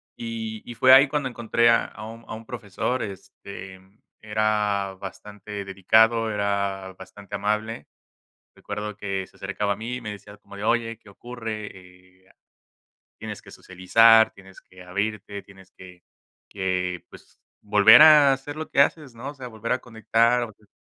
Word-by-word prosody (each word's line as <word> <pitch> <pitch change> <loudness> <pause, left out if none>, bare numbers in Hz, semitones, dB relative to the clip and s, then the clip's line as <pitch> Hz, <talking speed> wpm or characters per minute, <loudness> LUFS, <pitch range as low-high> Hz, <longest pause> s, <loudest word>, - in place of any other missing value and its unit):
Y 110 -2 -6
y 120 - -9
fue 130 +2 +6
ahí 135 +1 +7
cuando 145 -2 -1
encontré 120 -1 +1
a 115 - +4
a 105 +2 -10
un 115 +1 -11
a - - -5
un 115 +1 -9
profesor, 120 +1 -3
este, 95 -1 -10 0.4
era 105 -2 -1
bastante 100 +1 -8
dedicado, 110 +4 +3
era 100 -2 -2
bastante 100 +2 -10
amable. 105 +3 -2 0.7
Recuerdo 105 0 -7
que 100 -2 -4
se - - -24
acercaba 100 +1 -3
a - - -7
mí, 125 +3 -5
me 105 -2 -6
decía 105 0 -11
como 100 -1 -14
de: 100 - -5
"Oye, 115 0 0
¿qué 110 - -24
ocurre? 110 0 -7 0.6
Eh, - - -23 0.9
tienes - - -7
que - - -16
socializar, 110 +5 +4
tienes 95 -1 -16
que 90 0 -16
abrirte, 100 +2 -4
tienes 95 -1 -18
que 90 -1 -15 0.5
que, 90 -2 -2
pues, - - -18 0.2
volver 105 +3 +7
a 150 -3 +8
hacer 135 +2 -5
lo 155 +1 -6
que 140 - +2
haces, 145 -3 +1
¿no? 130 +5 -7
O - - -13
sea, 130 -3 -9
volver 110 +1 -4
a 125 - +1
conectar 115 +1 +1
o 120 - -4
hacer" 105 0 -24
110 Hz, 165 wpm, -24 LUFS, 100-115 Hz, 0.9 s, a